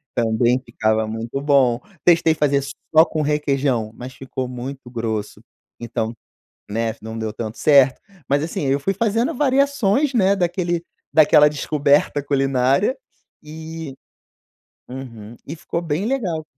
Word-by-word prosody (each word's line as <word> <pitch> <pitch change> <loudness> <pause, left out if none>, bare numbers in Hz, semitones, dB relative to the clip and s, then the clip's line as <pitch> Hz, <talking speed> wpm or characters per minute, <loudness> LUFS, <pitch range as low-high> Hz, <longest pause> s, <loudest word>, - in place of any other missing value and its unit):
também 120 +1 +2
ficava 110 -2 0
muito 115 +4 -4
bom. 135 -4 +3 0.2
Testei 170 -2 +4
fazer 145 -2 +1 0.3
só 160 +1 +8
com 155 - -3
requeijão, 140 -6 0
mas 125 +1 -9
ficou 130 0 -5
muito 125 +1 -7
grosso. 110 -3 -4 0.4
Então, 115 -1 -3 0.6
né, 110 +1 -2
não 110 +1 -7
deu 110 -1 -3
tanto 110 0 -6
certo, 135 -3 +4 0.3
mas, 140 +1 +2
assim, 160 -1 -3
eu 135 +1 +1
fui 195 - 0
fazendo 225 +4 0
variações, 275 -1 +2
né, 200 -4 +4
daquele 175 -2 -1 0.3
daquela 150 -1 +6
descoberta 145 0 +1
culinária 135 - +1 0.5
e 160 -1 -8 0.9
uhum, 120 -4 -9
e 155 - -5
ficou 165 +1 -4
bem 160 +3 -2
legal. 195 -12 -2
140 Hz, 130 wpm, -21 LUFS, 120-165 Hz, 0.9 s, só